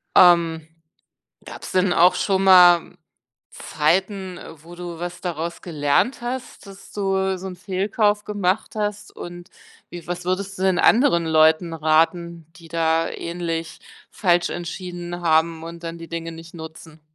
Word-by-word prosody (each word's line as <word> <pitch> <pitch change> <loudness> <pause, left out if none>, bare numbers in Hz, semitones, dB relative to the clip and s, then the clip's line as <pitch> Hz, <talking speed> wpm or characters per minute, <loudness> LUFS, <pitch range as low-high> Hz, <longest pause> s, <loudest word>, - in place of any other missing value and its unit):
Ähm, 165 -3 +5 0.8
gab's - - -9
denn 185 -1 +2
auch 175 +2 +5
schon 195 -1 0
mal 180 -3 +6 0.5
Zeiten, 185 +4 -1
äh, 160 -2 -12
wo 170 +1 -13
du 175 -1 -7
was 175 +1 -6
daraus 170 -1 -4
gelernt 155 - 0
hast, 245 0 -6
dass 195 0 -14
du 190 -1 -1
so 190 - -7
'n 185 - -7
Fehlkauf 205 +3 0
gemacht 205 -1 -1
hast? 210 -1 -4
Und 175 0 -9 0.4
wie 175 -2 -9
was 175 0 -5
würdest 195 +2 -2
du 185 - -3
denn 190 -2 +2
anderen 220 - +4
Leuten 160 +1 +3
raten, 165 +1 0
die 165 -2 -14
da 165 0 +1
ähnlich 170 -1 -5 0.3
falsch 175 -3 +1
entschieden 175 0 -6
haben 160 0 +2
und 170 +1 -9
dann 165 0 -6
die 165 - -10
Dinge 165 0 -5
nicht 165 0 -12
nutzen? 160 -1 -11
175 Hz, 145 wpm, -22 LUFS, 165-190 Hz, 0.8 s, mal